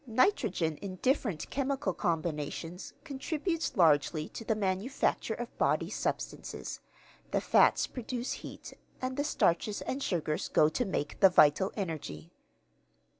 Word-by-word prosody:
Nitrogen 220 - +2
in 195 -2 -6
different 215 - 0
chemical 275 -7 -1
combinations 165 +1 -3
contributes 310 - -2
largely 155 -1 +4
to - - -7
the 220 0 0
manufacture 210 +3 0
of 240 +1 -7
body - - +1
substances; - - -4 0.5
the - - +1
fats - - +4
produce 250 0 -4
heat; - - -7 0.3
and 255 0 -3
the 285 - 0
starches 205 - +1
and 275 - -3
sugars 160 - -1
go 150 - +4
to 250 +10 -1
make 150 -7 -3
the 195 - +8
vital 175 +3 +5
energy. 155 - -5
195 Hz, 125 wpm, -31 LUFS, 160-255 Hz, 0.5 s, the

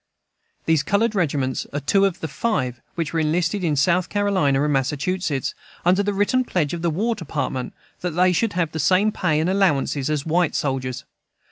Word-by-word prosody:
These 160 -2 +3
colored 205 +8 +1
regiments 140 - -1
are 145 - -2
two 195 +7 +3
of 195 -3 -2
the 160 - -2
five 130 - -2
which 165 -2 -3
were 165 - +1
enlisted 170 +5 0
in 155 -4 +1
South 170 +5 +2
Carolina 185 -10 +1
and 150 0 +1
Massachusetts, 145 +2 -1 0.3
under 185 +3 +4
the 205 0 0
written 205 +6 +1
pledge 170 - -1
of 170 - -4
the 170 - +1
War 210 +9 0
Department 145 - -4 0.2
that 180 -3 -3
they 180 +1 +4
should 220 +4 0
have 170 -3 0
the 160 - -4
same 185 +8 +3
pay 160 -7 0
and 160 - +1
allowances 155 -7 +1
as 150 -2 -1
white 170 0 +1
soldiers. 130 -3 -2
165 Hz, 190 wpm, -22 LUFS, 145-190 Hz, 0.3 s, under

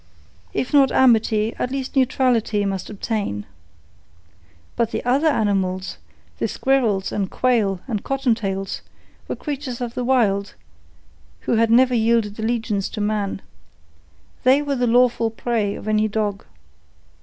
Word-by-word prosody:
If 260 - -3
not 275 -2 +5
amity, 225 -3 +3
at - - -1
least 270 0 -4
neutrality 245 -5 +2
must 195 -2 -3
obtain. 205 - -3 1.3
But 230 -2 +1
the - - -4
other 270 +6 +2
animals—the 195 -8 -2
squirrels, 235 -8 +1
and 195 -2 -2
quail, 215 -7 +1
and 215 -5 -3
cottontails, 220 -8 -1 0.5
were - - -3
creatures 280 -5 -5
of 240 -2 -4
the 250 - -3
Wild 215 -6 +1 0.9
who 230 - 0
had 230 0 +3
never 250 +2 +5
yielded 225 -2 +1
allegiance 220 -3 -1
to - - -7
man. 205 -2 -2 1.0
They 265 +3 +4
were 285 -1 -1
the 245 -1 +1
lawful 240 -1 +3
prey 225 -3 -1
of - - -9
any 215 0 +2
dog. 210 -2 -2
225 Hz, 130 wpm, -21 LUFS, 205-250 Hz, 1.3 s, not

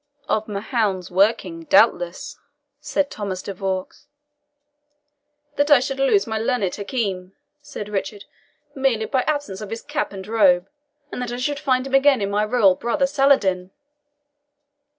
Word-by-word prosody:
"Of 215 0 0
Mahound's 205 -3 -2
working, 185 -4 +1
doubtless," 175 -2 +2 0.4
said 290 -1 -1
Thomas 195 -3 -5
de 200 - -5
Vaux. 190 -1 -5 1.5
"That 290 +1 +2
I 290 -3 +7
should 270 +2 -4
lose 395 +9 +3
my 220 -2 -3
learned 225 -5 -1
Hakim," 195 -4 -4 0.3
said 290 -8 -8
Richard, 205 0 -4 0.5
"merely 265 -5 0
by 260 +3 0
absence 285 -10 -2
of 210 - -7
his 225 - -6
cap 295 +1 -3
and 190 -1 -8
robe, 190 -4 +3 0.4
and - - -5
that 245 -1 -4
I 240 - -4
should 285 +3 -2
find 260 -3 +1
him 270 - -7
again 270 -1 +5
in 200 -1 -2
my 205 +1 +1
royal 215 -3 +4
brother 240 +8 0
Saladin!" 270 -11 +2
220 Hz, 150 wpm, -22 LUFS, 195-270 Hz, 1.5 s, I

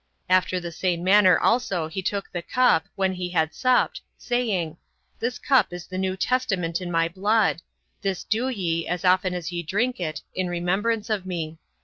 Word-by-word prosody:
After 185 0 +3
the 175 -1 -6
same 175 0 -1
manner 190 -1 +6
also 195 -9 +1
he 175 +4 -4
took 200 +1 -3
the 175 - -3
cup, 185 -5 +2
when 190 -1 +1
he 180 -1 -4
had 160 -3 0
supped, 255 -1 +2 0.2
saying: 200 -10 -1 0.4
this 240 +2 -2
cup 265 -8 +3
is 175 0 -7
the 185 - -6
new 190 0 -1
testament 190 -8 0
in 180 - -4
my 165 -1 +2
blood; 200 +1 +1 0.4
this 195 -2 -2
do 230 +4 0
ye, 170 -8 -1
as 180 +1 -2
often 185 0 +3
as 175 -1 -4
ye 175 -1 -2
drink 205 +9 -1
it, 155 -3 -4
in 185 -1 -1
remembrance 195 +6 -1
of 195 -3 -1
me. 165 -3 -4
185 Hz, 180 wpm, -24 LUFS, 175-210 Hz, 0.4 s, manner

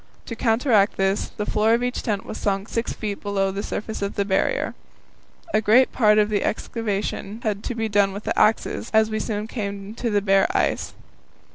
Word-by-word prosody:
To 230 - -6
counteract 225 -3 +2
this, 195 +1 +1
the 210 - -5
floor 220 +2 +3
of 240 - -2
each 250 0 -2
tent 205 -5 -2
was - - -6
sunk 195 +1 -1
6 230 0 -2
feet 205 -2 -5
below 195 -1 0
the 195 +1 -3
surface 215 +1 -5
of 200 0 -3
the 200 - 0
Barrier. 205 - 0 0.8
A 215 - +3
great 235 +5 +5
part 210 -3 +4
of 210 0 +3
this 205 -2 0
excavation 210 -1 -3
had 210 -2 -2
to 245 - -3
be 225 -1 -1
done 200 -2 +3
with 200 +2 -8
axes, 220 +1 +1
as 220 0 +4
we 215 - -1
soon 210 -1 -3
came 200 -3 -5
to 235 +1 -2
the 205 -2 +2
bare 195 -1 +4
ice. - - -1
210 Hz, 195 wpm, -23 LUFS, 200-225 Hz, 0.8 s, great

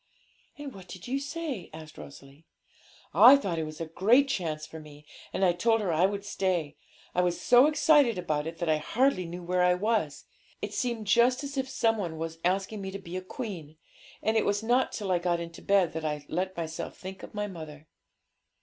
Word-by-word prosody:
'And 290 -2 -7
what 190 -2 -12
did 180 +3 -10
you 270 +3 -1
say?' 280 - -5
asked 155 0 -11
Rosalie. 140 +2 -13 0.7
'I 230 - +9
thought 185 -11 -2
it 160 - -2
was 155 0 -8
a 165 - -3
great 220 - +3
chance 160 - -2
for 160 - -10
me, 150 -1 -14 0.3
and 190 - +1
I 180 - +5
told 225 +6 +2
her 190 -6 -1
I 175 +4 +4
would 200 0 -5
stay. 180 -7 -1 0.4
I 180 - +2
was 175 -1 0
so 245 +3 +6
excited 295 -7 +4
about 155 -4 -2
it 165 0 -6
that 170 - -3
I 155 -1 +3
hardly 240 - +1
knew 175 +1 -7
where 180 +1 0
I 180 0 +4
was; 205 -6 -1 0.3
it - - -5
seemed 235 -3 -2
just 240 +6 +3
as 280 0 -6
if 265 -1 -2
some 225 -3 +1
one 170 -6 -4
was 165 0 -5
asking 195 +3 0
me 190 - -4
to 195 - -5
be 180 -2 -9
a 185 - -2
queen. 185 - -7 0.5
And 220 +2 +1
it 220 - +3
was 205 +1 0
not 245 +3 +2
till 200 -3 -3
I 180 - +3
got 175 -1 0
into 170 0 -8
bed 195 -4 +2
that 160 0 -4
I 150 -2 -3
let 185 0 -3
myself 160 -1 -5
think 190 +1 -8
of - - -11
my 210 0 -1
mother.' 155 -5 -9
185 Hz, 215 wpm, -28 LUFS, 165-225 Hz, 0.7 s, I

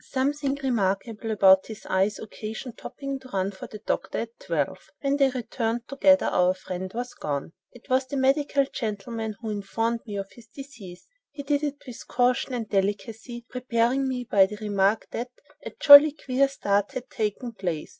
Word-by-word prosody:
"Something 280 +1 0
remarkable 220 -2 -1
about 190 -3 +5
his 220 -2 -9
eyes 195 +2 +1
occasioned 220 +2 -7
Topping 275 -1 -6
to 265 - -14
run 195 -4 -1
for 190 - -9
the 215 - -9
doctor 210 - -2
at 230 0 -8
twelve. 165 0 -3
When 280 0 +1
they 275 -1 +4
returned 235 -2 -3
together, 280 +1 +4
our 180 +1 +2
friend 185 0 -6
was 245 +3 -5
gone. 145 +2 -4 0.2
It 245 - -17
was 260 0 +1
the 280 - -4
medical 275 +1 +2
gentleman 220 -2 -4
who 220 -2 -4
informed 225 +3 -1
me 205 -1 -4
of 195 0 -5
his 235 -1 -16
decease. 230 -9 -11 0.2
He 285 0 -8
did 285 0 +1
it 290 -1 -4
with 250 -3 -10
caution 250 +1 +1
and 230 -3 -3
delicacy, 220 +4 -2
preparing 250 +1 0
me 255 -1 -2
by 200 -5 +4
the 210 - -7
remark 205 0 +1
that 245 +2 -4 0.3
'a - - -5
jolly 285 0 +10
queer 275 -2 +1
start 205 -7 0
had 255 0 -5
taken 220 +3 -2
place. 175 -7 -4
230 Hz, 175 wpm, -26 LUFS, 200-265 Hz, 0.3 s, jolly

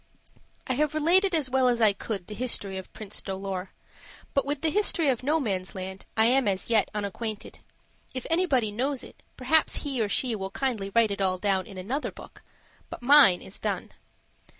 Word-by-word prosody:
I 260 - -1
have 300 +3 0
related 350 +4 +3
as 300 -5 +1
well 260 -1 +3
as 240 -1 +1
I 215 -3 +5
could 195 -2 -5
the 210 - -8
history 210 -4 -2
of 190 - -12
Prince 215 -1 -4
Dolor, 190 -1 -5 0.6
but 275 -2 +1
with 290 -1 -2
the 320 - +1
history 350 -6 +3
of 250 -3 0
Nomansland 195 -9 -2
I 220 - +5
am 255 0 +3
as 195 +3 -1
yet 220 -2 +3
unacquainted. 210 +1 -5 0.5
If 255 -2 -6
anybody 290 - +1
knows 260 +5 -2
it, - - -14 0.2
perhaps 305 +5 +2
he 275 -5 -2
or 210 - 0
she 245 +2 +1
will 190 -2 -4
kindly 220 -3 -2
write 230 -2 +4
it 200 - -3
all 185 -1 +2
down 190 0 0
in 195 -4 -10
another 240 +11 -3
book. - - -13 0.5
But - - -9
mine 255 -9 +7
is 190 - -6
done. - - -3
230 Hz, 185 wpm, -27 LUFS, 195-275 Hz, 0.6 s, mine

